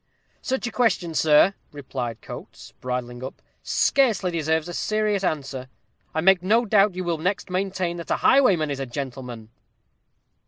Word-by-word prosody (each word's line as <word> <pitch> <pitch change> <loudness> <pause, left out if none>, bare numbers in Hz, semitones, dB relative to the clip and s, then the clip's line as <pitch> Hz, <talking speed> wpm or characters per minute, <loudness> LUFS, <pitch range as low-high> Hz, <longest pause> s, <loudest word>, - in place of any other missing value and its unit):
"Such 265 -1 -2
a 240 - -3
question, 205 -9 +1
sir," 155 +5 +5 0.2
replied 130 -5 -5
Coates, - - -10
bridling 125 -1 -4
up, 130 - -7 0.2
"scarcely 220 -10 +2
deserves 160 -1 0
a 175 - -6
serious 215 0 0
answer. 135 -6 -3 0.5
I 160 - +1
make 190 +1 +5
no 225 +6 +3
doubt 205 -2 +3
you 185 - -3
will 170 -2 -1
next 185 +2 -2
maintain 185 -2 -1
that 170 - -8
a - - +2
highwayman 185 - +4
is 140 - -3
a 135 - -3
gentleman." 125 -3 -7
170 Hz, 155 wpm, -24 LUFS, 135-195 Hz, 0.5 s, sir